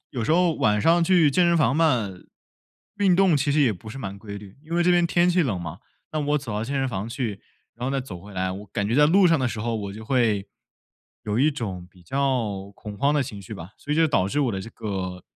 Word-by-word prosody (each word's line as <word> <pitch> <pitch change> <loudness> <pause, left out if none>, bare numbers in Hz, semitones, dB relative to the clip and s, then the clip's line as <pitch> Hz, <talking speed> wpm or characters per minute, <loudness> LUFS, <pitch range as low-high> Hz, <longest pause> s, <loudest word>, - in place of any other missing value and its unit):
有 120 -5 -3
时 - - +1
候 175 -1 +3
晚 105 -5 +2
上 170 +7 +4
去 170 -4 +4
健 175 +5 +3
身 170 0 +3
房 135 -5 +3
嘛， 130 -11 +2 0.9
运 195 -3 +4
动 190 -3 +4
其 140 +1 0
实 150 +2 +3
也 130 -6 +4
不 110 +3 -11
是 110 - -8
蛮 100 -6 -6
规 100 0 -8
律。 100 +2 -12
因 165 +2 -6
为 175 - +3
这 180 - +3
边 175 -1 +4
天 175 +1 +3
气 180 0 +3
冷 115 - -1
嘛， 85 -3 -7 0.3
那 155 - -1
我 145 0 +1
走 135 -6 -6
到 105 +1 -2
健 140 +4 -4
身 135 0 +1
房 105 -2 -4
去， 115 -5 -4 0.3
然 120 +2 -4
后 - - -2
再 135 - 0
走 100 -9 -8
回 100 +2 -12
来， 95 0 -1
我 100 +2 -8
感 100 +1 -2
觉 110 - -1
在 150 +2 +6
路 185 +4 +5
上 165 -2 +4
的 130 - +1
时 115 -2 -5
候， 115 +1 -2
我 100 -2 -5
就 110 +2 -9
会， 110 -5 +1 0.8
有 105 +1 -2
一 145 +4 +4
种 100 -11 -5
比 90 0 -20
较 110 -4 -1
恐 105 -1 -9
慌 140 +6 +2
的 145 - +2
情 110 -6 -7
绪 95 - -8
吧。 85 +3 -9
所 145 - -9
以 - - 0
就 165 0 +5
导 95 -11 +1
致 145 - 0
我 130 -5 +1
的 95 - -3
这 110 - -8
个 95 -4 -5
120 Hz, 290 characters per minute, -24 LUFS, 100-150 Hz, 0.9 s, 在